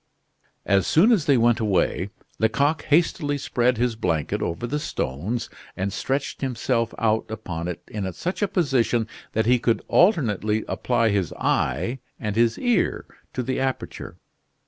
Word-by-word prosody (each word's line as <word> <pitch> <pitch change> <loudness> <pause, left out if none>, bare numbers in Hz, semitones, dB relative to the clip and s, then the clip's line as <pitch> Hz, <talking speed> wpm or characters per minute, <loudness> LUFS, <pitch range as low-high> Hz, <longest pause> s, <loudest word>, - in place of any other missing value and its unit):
As 100 -3 +2
soon 195 +10 +5
as 195 -10 +3
they 140 -3 +5
went 120 0 +3
away, 100 -3 +1 0.3
Lecoq 140 +8 +2
hastily 150 -2 +2
spread 125 -2 +1
his 120 0 +1
blanket 80 -8 -1
over 85 +7 -2
the 145 +5 -2
stones 95 - -3 0.3
and 95 +1 -2
stretched 135 +5 -2
himself 120 -3 0
out 110 -1 +1
upon 85 -6 -5
it 90 -2 -5
in 100 -3 -4
such 180 - -4
a 205 - +3
position 125 - +1 0.3
that 110 0 +1
he 125 +1 +4
could 115 -1 +1
alternately 110 - +2
apply 115 -2 +1
his 100 -5 0
eye 90 - 0 0.2
and 105 -4 -3
his 115 0 +3
ear 245 -3 +1 0.3
to 125 - -2
the 130 +2 -2
aperture. 130 -1 -4
115 Hz, 150 wpm, -24 LUFS, 105-135 Hz, 0.3 s, soon